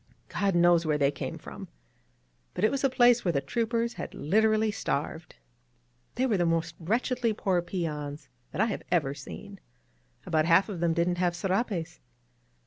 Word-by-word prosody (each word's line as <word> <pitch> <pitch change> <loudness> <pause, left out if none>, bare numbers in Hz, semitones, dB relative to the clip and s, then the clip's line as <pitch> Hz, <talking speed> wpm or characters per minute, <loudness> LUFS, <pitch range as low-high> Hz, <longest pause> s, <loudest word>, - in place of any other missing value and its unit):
God 195 -2 0
knows 175 -1 +5
where 155 -2 +1
they 140 -1 +3
came 140 - -5
from, - - -9 0.9
but 180 - -3
it 215 - +4
was 275 0 -2
a 275 - +4
place 245 -2 +4
where 175 - +2
the 140 - +1
troopers 230 - -1
had - - -7
literally 215 +6 +2
starved. 160 -5 -3 0.8
They 255 - +1
were 225 -6 +2
the 175 - +2
most 165 0 0
wretchedly 230 +5 0
poor 190 -4 0
peons 150 -5 -4 0.2
that - - -2
I - - +5
have 220 - -3
ever 150 -6 +2
seen 130 - -10 0.3
— - - -37
about 155 -1 +1
half 170 +5 +4
of 190 -5 -5
them 170 -1 +1
didn't 175 +1 +1
have 175 -1 +1
serapes. 185 -3 -2
175 Hz, 175 wpm, -28 LUFS, 160-220 Hz, 0.9 s, knows